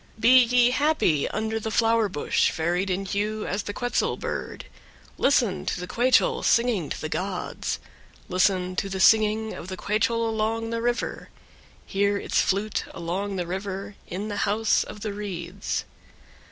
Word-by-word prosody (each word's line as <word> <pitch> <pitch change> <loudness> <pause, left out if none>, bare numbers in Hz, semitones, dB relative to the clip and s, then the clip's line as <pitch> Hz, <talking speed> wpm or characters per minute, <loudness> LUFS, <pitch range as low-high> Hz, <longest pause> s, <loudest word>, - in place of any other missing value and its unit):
7. 215 - -17
Be 230 - +5 0.2
ye 245 +1 +4
happy 285 - +2
under 220 +1 -2
the 220 - -4
flower 225 -1 +2
bush 145 -5 +1
varied 175 +4 -1
in 190 +2 -1
hue 210 +2 -2
as 200 +2 -2
the 205 - -5
quetzal 245 +3 -1
bird; - - -5 0.5
listen 240 -8 +2
to - - -1
the 180 - -4
quechol 255 - +2
singing 235 -10 +2
to - - -4
the 155 - -3
gods; 185 +3 -3 0.5
listen 185 0 +1
to 195 - -1
the 190 0 -4
singing 220 +1 +4
of 170 - -8
the 185 0 -6
quechol 225 +3 0
along 225 +1 -1
the 230 0 -2
river; 240 +1 -2 0.6
hear 200 +1 +1
its - - +1
flute 200 +2 0
along 195 +4 -3
the 180 -2 -2
river 195 +2 -5
in 195 +4 -4
the 205 -1 -4
house 210 +2 +2
of 210 - -10
the 210 -1 -3
reeds. 195 -2 -4
205 Hz, 165 wpm, -25 LUFS, 190-225 Hz, 0.6 s, Be